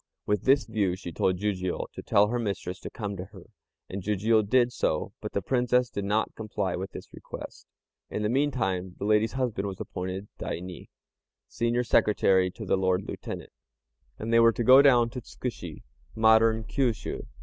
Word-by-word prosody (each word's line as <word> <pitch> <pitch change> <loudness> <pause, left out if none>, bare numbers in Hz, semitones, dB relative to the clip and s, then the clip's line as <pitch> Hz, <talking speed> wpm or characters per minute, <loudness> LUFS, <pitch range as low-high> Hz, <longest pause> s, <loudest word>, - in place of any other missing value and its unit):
With 105 -2 0
this 135 +1 +4
view 105 -5 0
she 90 -2 -8
told 90 +3 +1
Jijiu 95 -2 -2
to - - -7
tell 105 +1 +3
her 120 +1 -1
mistress 100 -5 -3
to - - -7
come 105 -3 -5
to 90 - -5
her, 95 -2 -14 0.4
and 95 +1 -5
Jijiu 105 +3 +2
did 120 +4 +2
so; 80 -10 -1
but - - -6
the - - -1
Princess 125 -1 +1
did 100 - -3
not 105 +2 0
comply 100 -4 -3
with 95 +2 -5
this - - -10
request. - - -9 0.4
In 105 - -3
the - - +2
meantime 105 -9 0
the - - -4
lady's 105 +1 +2
husband 120 -7 -1
was 95 -2 -6
appointed 95 +2 -5
Daini 90 0 -6 0.6
(Senior 120 +1 0
Secretary 95 -5 +3
to - - -9
the - - +2
Lord 95 0 +1
Lieutenant), - - -7 0.7
and 115 +2 -3
they 115 - +6
were 115 0 +6
to 120 - -2
go 130 +4 +8
down 120 -4 +5
to 125 0 -6
Tzkushi 100 -10 -7 0.3
(modern 110 0 +4
Kiusiu). 120 -1 -2
105 Hz, 180 wpm, -27 LUFS, 95-120 Hz, 0.7 s, go